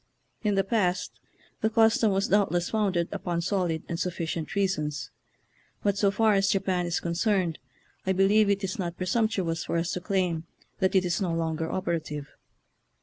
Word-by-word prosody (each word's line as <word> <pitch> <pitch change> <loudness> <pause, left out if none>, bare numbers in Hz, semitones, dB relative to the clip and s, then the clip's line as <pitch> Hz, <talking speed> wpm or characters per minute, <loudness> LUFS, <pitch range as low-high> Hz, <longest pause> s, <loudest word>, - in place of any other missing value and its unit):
In 210 -3 +1
the 195 - +3
past 190 -4 0 0.4
the. 220 - +2
custom 225 -1 +4
was 195 +1 0
doubtless 185 -4 +2
founded 195 -6 +1
upon 175 -4 -2
solid 175 -3 -1
arid 165 - -3
sufficient 170 -2 -3
reasons, 150 -8 -1 0.7
but 200 -1 +2
so 200 0 +3
far 215 +2 +3
as 195 -1 +3
Japan 185 -2 +1
is 170 - 0
concerned 175 -1 0 0.5
I - - +3
believe 200 +3 +4
it 200 0 +1
is 190 +1 -3
not 175 -2 -3
presumptu 195 0 0
ous 165 0 -3
for - - -1
us 170 +1 -1
to 180 - -3
claim 180 -4 0 0.3
that 190 0 +1
it 185 -1 +4
is 175 +2 0
no 180 -3 0
longer 160 -1 -2
operative. 160 -5 -3
185 Hz, 170 wpm, -27 LUFS, 170-200 Hz, 0.7 s, custom